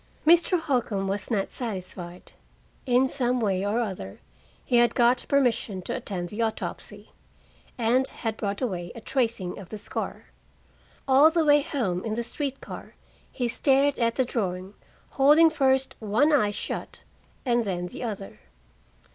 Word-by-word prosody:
Mr. 340 +2 +5
Holcombe 235 -10 -1
was 195 +1 -3
not 205 -5 -1
satisfied. 185 -6 -6 0.6
In 250 +1 +4
some 250 -2 0
way 195 -4 0
or 205 +3 0
other 185 - -5 0.5
he 245 - +2
had 240 0 +4
got 245 0 +3
permission 235 -8 +1
to - - -3
attend 175 -3 -4
the 215 +2 -4
autopsy, 220 -1 -4 0.7
and 245 +3 +2
had 225 -2 -4
brought 205 +2 -3
away 175 -7 -3
a - - -7
tracing 225 -7 -1
of 185 -3 -11
the 215 - -6
scar. 205 - -5 0.8
All 275 +4 +7
the 325 -1 +1
way 290 0 +6
home 235 - -2
in 220 -1 -2
the 235 - -2
street 275 +3 -4
car - - -9 0.4
he 245 -3 -2
stared 275 +3 +2
at 230 -1 +1
the 260 - +2
drawing, 190 -5 -3 0.4
holding 300 +4 +6
first 265 -3 +2
one 225 +8 +2
eye 215 -8 +4
shut 205 - -5 0.4
and 240 -2 +2
then 180 -4 -3
the 180 - -8
other. 205 -5 -6
235 Hz, 155 wpm, -26 LUFS, 200-265 Hz, 0.8 s, All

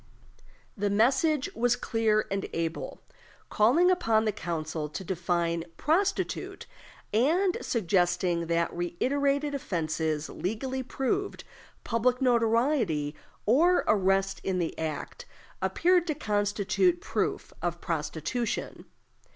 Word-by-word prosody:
The 205 0 0
message 260 +7 +2
was 245 +1 +2
clear 225 -3 +1
and 195 0 -2
able, 165 0 -3 0.5
calling 290 +13 +4
upon 225 -12 +2
the 215 - +2
council 160 -5 -4
to 170 - -6
define 170 -2 -1
"prostitute," 390 +6 0 0.5
and 335 - +3
suggesting 175 -4 +1
that 170 0 0
"reiterated 280 - 0
offenses 160 - -2
legally 255 +7 -3
proved, 270 +10 -2 0.4
public 245 +2 +1
notoriety, 230 - +2 0.3
or 330 - +4
arrest 195 -1 +2
in 190 -1 -1
the 170 -3 -2
act," 160 - -5 0.3
appeared 355 0 +2
to 310 - 0
constitute 210 - +1
proof 410 - -2
of 175 0 -2
prostitution. 165 - -3
215 Hz, 100 wpm, -28 LUFS, 175-270 Hz, 0.5 s, calling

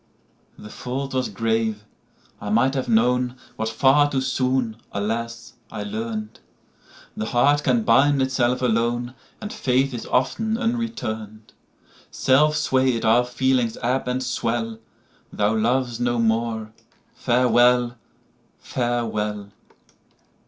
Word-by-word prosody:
The 105 - -11
fault 135 +4 -5
was 130 -1 -1
grave: 110 0 -1 0.6
I 105 - -5
might 115 +5 +3
have 130 -3 -2
known, 125 +2 +2 0.2
What 110 0 -2
far 135 +5 +4
too 135 -2 -1
soon, 130 -3 0
alas, 115 +3 -4 0.2
I 105 -2 -5
learn'd—The 110 0 -8
heart 145 +5 +3
can 230 - +2
bind 145 -6 +4
itself 130 -1 +1
alone, 120 +1 0 0.3
And 210 0 -6
faith 130 +1 +1
is 120 - -6
often 220 - 0
unreturn'd.—Self 135 - -2
sway'd 130 -5 +1
our 115 +2 +5
feelings 125 -2 0
ebb 125 +2 0
and 125 +1 -1
swell:Thou 115 -3 -3
lov'st 120 +2 0
no 120 0 0
more: 110 -1 0 0.4
Farewell! 120 0 +3 0.6
Farewell! 110 -4 -2
120 Hz, 105 wpm, -23 LUFS, 110-130 Hz, 0.6 s, our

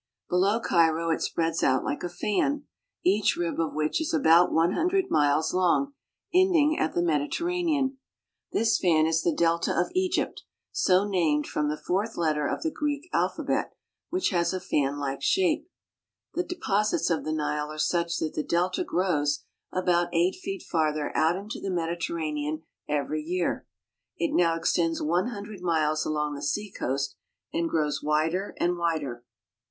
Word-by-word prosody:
Below 195 +5 +3
Cairo 165 -4 +2
it 160 - 0
spreads 165 -1 0
out 130 0 +3
like 145 - -3
a 175 - -2
fan, 210 +11 0 0.4
each 200 +3 +3
rib 170 -1 -2
of 165 -2 -1
which 155 - 0
is 320 +1 -1
about 175 - +5
one 165 +2 +3
hundred. 365 - +1
miles 150 +2 +2
long, 185 +10 +2 0.4
ending 345 -5 +4
at 155 - 0
the 175 - +2
Mediterranean. 275 - 0 0.5
This 225 -1 +2
fan 160 -4 +3
is 160 0 +2
the 170 - +2
delta 170 +1 +1
of 175 - 0
Egypt, 370 0 0 0.3
so 190 +2 +3
named 160 -7 +1
from 150 0 -1
the 150 - -2
fourth 200 +8 -2
letter 155 -3 +1
of - - -3
the 320 - 0
Greek 295 +2 -3
alphabet, - - 0 0.3
which 365 +1 0
has 170 0 +1
a - - -2
fanUke 140 -5 -1
shape. 335 -3 +1 0.6
The 355 - 0
deposits 245 - 0
of 165 - 0
the 155 - -3
Nile 150 -1 -1
are 155 - -8
such 170 +2 0
that 155 - -2
the - - -1
delta 175 +4 0
grows 145 -6 0 0.3
about 175 -1 +1
eight 175 +2 +3
feet 380 0 -6
farther 155 -2 -1
out 160 +2 +3
into 200 +4 -6
the 195 - -3
Mediterranean 160 -3 -2 0.3
every 150 +1 -1
year. 175 +3 -2 0.5
It 170 - -1
now 170 -2 +3
extends 165 0 +1
one 175 +7 +1
hundred 210 -4 -7
miles 155 -3 +1
along 150 -1 -1
the 140 - -6
seacoast 140 -5 -2 0.4
and 170 0 0
grows 150 -3 0
wider 160 +6 0
and 175 0 +1
wider. 150 -8 -2
170 Hz, 160 wpm, -27 LUFS, 155-205 Hz, 0.6 s, about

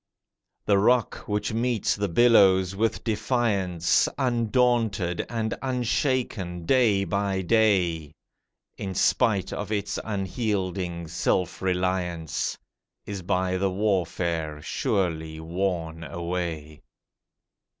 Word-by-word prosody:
The 100 -1 +4
rock 120 +4 +1
which 105 +1 -1
meets 115 -1 0
the 100 -1 -2
billows 95 -3 +5
with 110 +3 0
defiance, 105 -6 +1
Undaunted 115 -7 +1
and 110 -2 -2
unshaken 125 - -1
day 110 -4 +3
by 100 0 -1
day, 90 -7 +2 0.6
In 95 -1 -4
spite 110 -4 +2
of 105 +1 -5
its 105 -2 -2
unyielding 95 -4 -2
self 90 +2 -1
reliance, 90 -3 -1 0.5
Is 100 -2 -5
by 90 +1 0
the 95 +1 +1
warfare 85 -5 -1
surely 80 0 -1
worn 85 -1 -3
away. 85 -1 -4
95 Hz, 95 wpm, -26 LUFS, 85-110 Hz, 0.6 s, billows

